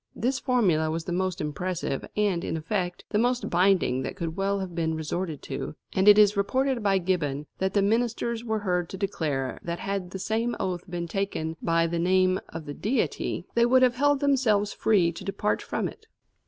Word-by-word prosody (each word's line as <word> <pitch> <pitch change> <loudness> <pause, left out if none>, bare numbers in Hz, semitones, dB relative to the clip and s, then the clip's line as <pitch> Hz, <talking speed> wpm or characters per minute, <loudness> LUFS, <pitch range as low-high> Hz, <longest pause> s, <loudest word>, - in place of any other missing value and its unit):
This 255 +3 0
formula 180 -12 +2
was 160 +1 -2
the 175 - -5
most 185 0 -1
impressive 155 -1 -3
and, 200 -5 +1
in - - -2
effect, 175 +2 -3
the 210 - +2
most 245 +2 0
binding 180 -7 +3
that - - -4
could 165 -4 -4
well 195 +1 0
have 190 -2 -5
been 160 -1 -1
resorted 160 0 -3
to, - - -5 0.2
and 190 +1 +2
it 210 0 +9
is 210 0 +6
reported 255 +5 +1
by 200 -2 +3
Gibbon 160 -6 -1
that 190 +1 -1
the 200 - +4
ministers 230 +2 0
were 220 -2 -1
heard 180 -3 0
to 190 - -6
declare 155 -9 -2
that 170 0 -4
had 195 -2 -3
the 190 - -6
same 225 +5 -1
oath 185 -1 -3
been 175 -1 -3
taken 165 -3 -2
by 165 0 +2
the 165 0 -1
name 185 +1 +3
of 165 -1 -7
the 145 - -5
Deity 225 - -1
they 235 0 +4
would 255 +1 +5
have 250 -1 +5
held 290 +1 +3
themselves 235 -8 +2
free 190 -6 +3
to 170 - -9
depart 200 +2 -1
from - - -2
it. 445 0 -12
190 Hz, 200 wpm, -27 LUFS, 170-215 Hz, 0.2 s, it